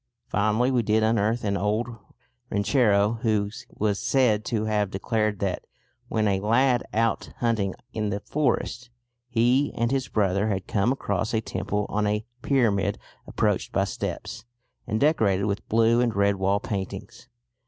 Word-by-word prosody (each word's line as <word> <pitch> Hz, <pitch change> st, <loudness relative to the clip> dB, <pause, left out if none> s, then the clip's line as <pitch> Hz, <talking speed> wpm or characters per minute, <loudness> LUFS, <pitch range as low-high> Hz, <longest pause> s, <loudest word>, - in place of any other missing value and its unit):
Finally 110 Hz, +5 st, +2 dB
we 125 Hz, -2 st, +2 dB
did 110 Hz, 0 st, +2 dB
unearth 110 Hz, +1 st, +1 dB
an 100 Hz, -1 st, 0 dB
old 105 Hz, +4 st, 0 dB, 0.6 s
ranchero 105 Hz, -1 st, +2 dB
who 105 Hz, -4 st, +1 dB, 0.2 s
was 105 Hz, -1 st, -1 dB
said 120 Hz, -6 st, +2 dB
to 110 Hz, -1 st, -1 dB
have 105 Hz, -2 st, 0 dB
declared 105 Hz, +2 st, -1 dB
that, 95 Hz, -2 st, -2 dB, 0.4 s
when 110 Hz, -3 st, 0 dB
a 95 Hz, -1 st, +1 dB
lad 120 Hz, +4 st, +2 dB
out 115 Hz, +1 st, 0 dB
hunting 110 Hz, -5 st, 0 dB, 0.2 s
in 105 Hz, -2 st, -1 dB
the 100 Hz, 0 st, -2 dB
forest, 125 Hz, -2 st, -1 dB, 0.4 s
he 125 Hz, +4 st, +2 dB
and 115 Hz, +1 st, 0 dB
his 135 Hz, -1 st, 0 dB
brother 100 Hz, 0 st, +1 dB
had 95 Hz, -3 st, -2 dB
come 105 Hz, +4 st, +1 dB
across 115 Hz, -4 st, -1 dB
a -, -, +3 dB
temple 105 Hz, 0 st, -2 dB
on 105 Hz, 0 st, 0 dB
a 105 Hz, +1 st, -1 dB, 0.2 s
pyramid 115 Hz, -9 st, +1 dB, 0.3 s
approached -, -, 0 dB
by -, -, +2 dB
steps, -, -, -5 dB, 0.4 s
and 110 Hz, -, -1 dB
decorated 110 Hz, -11 st, +2 dB
with 100 Hz, 0 st, -3 dB
blue 115 Hz, +2 st, +4 dB
and 120 Hz, -2 st, 0 dB
red 100 Hz, 0 st, +2 dB
wall 95 Hz, +1 st, +1 dB
paintings. 100 Hz, +4 st, -6 dB
110 Hz, 155 wpm, -25 LUFS, 100-115 Hz, 0.6 s, blue